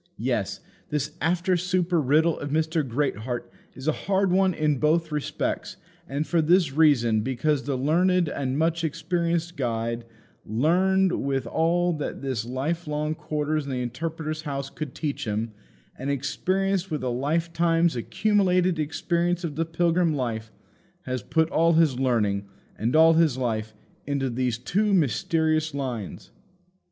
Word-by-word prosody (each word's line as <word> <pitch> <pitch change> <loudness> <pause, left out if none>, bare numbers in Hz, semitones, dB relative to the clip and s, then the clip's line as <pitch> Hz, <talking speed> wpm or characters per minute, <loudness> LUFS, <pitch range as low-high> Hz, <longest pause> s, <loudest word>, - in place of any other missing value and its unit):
Yes; - - -2 0.3
this 150 +1 -2
after 180 +2 +1
supper 180 -1 +1
riddle 155 +4 +3
of 145 - -4
Mr. 160 +2 +1
Greatheart 125 -2 -2 0.2
is 130 +3 -8
a - - +5
hard 195 +3 0
one 190 +1 +4
in 150 -3 +1
both 160 +1 +2
respects; 150 -1 -3 0.3
and 140 +3 -1
for 170 0 +2
this 165 -2 +3
reason, 125 -8 +4
because 135 +4 0
the 140 -2 -1
learned 175 +6 +2
and 135 -2 -2
much 165 +1 +1
experienced 170 +1 -1
guide 115 -2 -2 0.4
learned 180 - +2
with 135 -2 -1
all 170 +7 +1
that 150 - -5
his 130 -4 -2
life 150 +7 -2
long 150 +1 -1
quarters 150 -1 -2
in 140 - -5
the 125 -1 -1
Interpreter's 155 +5 -4
House 140 -2 -4
could 150 -4 -6
teach 145 -3 -3
him, 110 +1 -2 0.4
and 135 +2 -5
experienced 185 +7 0
with 155 -5 -3
a 130 - 0
lifetime's 165 +5 +1
accumulated 185 - +1
experience 170 +3 0
of 155 -4 -3
the 165 +2 0
pilgrim 165 0 +1
life 110 -4 -3 0.5
has 130 -1 -3
put 160 +8 +1
all 165 +1 +3
his 155 -6 +3
learning 105 -6 +1 0.3
and 115 +6 -1
all 160 +1 +7
his 160 -5 +3
life 110 -4 -2 0.3
into 140 -2 -1
these 125 -1 -1
two 200 - +1
mysterious 160 -1 +1
lines. 125 -8 -5
155 Hz, 145 wpm, -25 LUFS, 130-170 Hz, 0.5 s, all